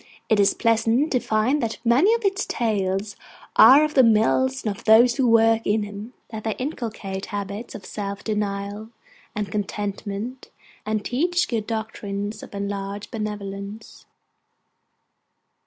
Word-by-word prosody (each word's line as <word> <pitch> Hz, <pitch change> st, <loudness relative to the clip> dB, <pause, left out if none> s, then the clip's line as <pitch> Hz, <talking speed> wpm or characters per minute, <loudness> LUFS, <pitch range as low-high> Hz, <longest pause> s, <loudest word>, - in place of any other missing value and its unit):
It 220 Hz, -, +3 dB
is 200 Hz, -, +4 dB
pleasant 230 Hz, +5 st, +2 dB
to 250 Hz, -, +2 dB
find 235 Hz, +7 st, +1 dB
that 225 Hz, -1 st, -2 dB
many 265 Hz, -, +4 dB
of 465 Hz, -2 st, -4 dB
its 395 Hz, +1 st, 0 dB
Tales 200 Hz, -3 st, -1 dB, 0.4 s
are 280 Hz, +3 st, +8 dB
of 305 Hz, 0 st, -1 dB
the 265 Hz, -, +6 dB
Mills 250 Hz, +4 st, +2 dB
and 210 Hz, -2 st, -1 dB
of -, -, -15 dB
those 235 Hz, +3 st, +6 dB
who 260 Hz, -3 st, +2 dB
work 225 Hz, 0 st, +4 dB
in 215 Hz, +1 st, +1 dB
them; 205 Hz, +3 st, -7 dB, 0.2 s
that 220 Hz, -1 st, -6 dB
they 220 Hz, -2 st, -2 dB
inculcate 220 Hz, -8 st, -5 dB
habits 205 Hz, +2 st, -5 dB
of 195 Hz, -, -9 dB
self 200 Hz, -1 st, -5 dB
denial 205 Hz, 0 st, -3 dB, 0.5 s
and 205 Hz, -3 st, -3 dB
contentment, 205 Hz, +3 st, -4 dB, 0.4 s
and 215 Hz, -1 st, -1 dB
teach 350 Hz, +7 st, +1 dB
good 220 Hz, -3 st, -2 dB
doctrines 210 Hz, -2 st, -4 dB
of -, -, -11 dB
enlarged 200 Hz, 0 st, -4 dB
benevolence. 210 Hz, -1 st, -6 dB
215 Hz, 140 wpm, -23 LUFS, 205-235 Hz, 0.5 s, are